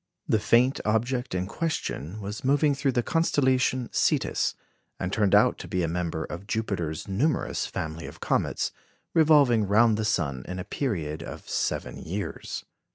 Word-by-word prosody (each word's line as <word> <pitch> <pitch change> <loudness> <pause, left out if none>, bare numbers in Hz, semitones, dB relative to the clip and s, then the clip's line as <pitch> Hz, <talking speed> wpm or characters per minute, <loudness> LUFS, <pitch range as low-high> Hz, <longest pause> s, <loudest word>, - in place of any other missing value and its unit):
The 110 - +3
faint 125 +5 +3
object 120 +2 0
in 90 0 0
question 105 - -3
was 105 +1 -6
moving 145 +2 +3
through 140 -1 0
the 120 - +1
constellation 130 -6 +2
Cetus, - - +1 0.4
and 90 - -3
turned 105 -3 +3
out - - +4
to - - -7
be 90 -1 -1
a - - +1
member 85 -1 -2
of 90 +4 -8
Jupiter's 95 -9 -2
numerous 130 +11 0
family 80 +1 -5
of - - -11
comets, - - 0 0.4
revolving 145 -9 +5
round 110 +2 +4
the 110 - -1
sun 70 -11 0
in 90 - -5
a 90 - -3
period 85 - -2
of - - -8
seven - - -2
years. 100 +4 -5
105 Hz, 160 wpm, -27 LUFS, 90-130 Hz, 0.4 s, revolving